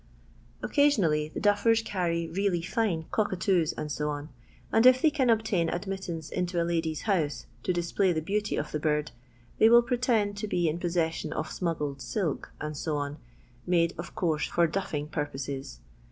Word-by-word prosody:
Occasionally 190 - +3
the - - -5
duffers 210 +3 +3
carry 170 -5 -1
really 175 0 0
fine 185 -4 -1
cock 215 - +1
atoos, 185 -3 +1 0.2
&C., 150 0 -3 0.4
and 225 +2 +5
if 255 0 +7
they 310 +3 +4
can 270 -5 +1
obtain 220 -7 +2
admittance 175 -3 -4
into 180 -1 -1
a 170 - +1
Udy's 165 -2 -1
house, 170 -9 0 0.2
to 180 - 0
display 175 +2 +1
the 160 - 0
beauty 205 +6 -1
of 150 - -3
the 150 - -2
bird, 150 -1 0 0.5
they 220 - +7
will 235 +1 +7
pretend 235 -5 +1
to 215 +1 -3
be 175 -4 +1
in 160 +2 -1
possession 170 -2 -1
of 155 0 -3
smuggled 150 -6 -2
silk, 140 - -2 0.2
&c., 155 +2 -3 0.8
made 170 -2 +3
of 170 - -8
course 160 -4 0
for 170 - +2
duffing 155 -4 -2
purposes. 140 -3 -5
175 Hz, 160 wpm, -28 LUFS, 155-205 Hz, 0.8 s, if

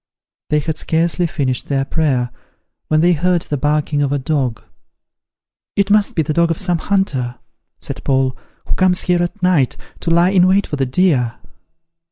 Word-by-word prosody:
They 150 - +2
had 155 +1 -2
scarcely 170 +2 +1
finished 135 -7 -2
their 135 -1 0
prayer, 135 -6 0 0.6
when 155 0 +2
they 175 +2 +4
heard 175 +1 +1
the 145 - -3
barking 150 +1 0
of 140 -1 0
a 145 - +1
dog. 130 -4 -2 1.1
"It 200 0 +1
must 210 -1 +3
be 160 - +2
the 155 +1 -2
dog 170 +1 +2
of 165 - -1
some 175 -3 0
hunter," 145 -12 -1 0.5
said - - -6
Paul, 130 -1 +1 0.3
"who - - -3
comes 185 -1 +2
here 175 -1 +1
at 180 +3 -4
night, 170 -8 +2 0.2
to - - -3
lie 170 +2 +4
in 185 -2 +4
wait 195 +1 +3
for - - -4
the 135 -1 0
deer." 130 -6 +1
160 Hz, 180 wpm, -18 LUFS, 135-180 Hz, 1.1 s, they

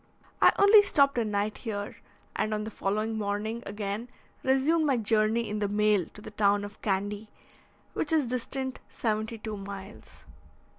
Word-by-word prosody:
I - - +8
only 405 +1 +8
stopped 280 -9 +3
a - - +2
night 210 0 -2
here, 205 -3 -5 0.4
and 215 0 0
on 210 - -3
the 220 - -6
following 215 +3 -2
morning 210 +3 -2
again 205 +3 -4 0.3
resumed 290 +5 +2
my 270 -3 +2
journey 220 +1 +2
in 210 0 -3
the 205 - 0
mail 205 -3 +2
to 210 - -11
the - - -9
town 205 -1 +2
of 205 0 -12
Candy, 205 +1 -2 0.6
which 300 - -1
is 310 -4 +3
distant 255 +2 -3
seventy 220 0 -2
two 215 -1 -6
miles. 195 - -10
215 Hz, 160 wpm, -28 LUFS, 205-240 Hz, 0.6 s, I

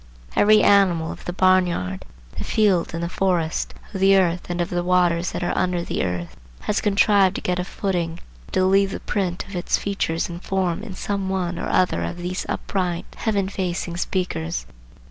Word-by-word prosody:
Every 215 +1 +5
animal 185 -5 +4
of - - -10
the - - -2
barn 185 0 +4
yard, 95 - -4 0.3
the - - -4
field 195 -6 +2
and 165 - -3
the - - 0
forest, 175 -3 -1 0.2
of 190 - -3
the 195 +1 +6
earth 180 -2 +1
and 175 0 -2
of 175 - -1
the 175 0 0
waters 175 -1 +2
that 180 - -4
are - - -1
under 180 -1 0
the - - -2
earth, 90 -2 -3 0.3
has 210 - 0
contrived 200 -2 +4
to - - -3
get 180 0 -1
a - - 0
footing 175 -3 -2 0.3
and - - -18
to 185 - +3
leave 195 +1 +4
the - - -5
print 180 -3 -2
of 200 - -9
its 175 - +1
features 195 -5 -1
and 175 0 -7
form 185 -3 -1
in 190 - -7
some 200 -1 -2
one 180 -2 -2
or - - -3
other 185 -1 +2
of 175 - -3
these 180 +1 -4
upright, 180 -3 -2
heaven 205 -4 0
facing 180 -3 -3
speakers. 175 -2 -2
180 Hz, 200 wpm, -23 LUFS, 175-195 Hz, 0.3 s, the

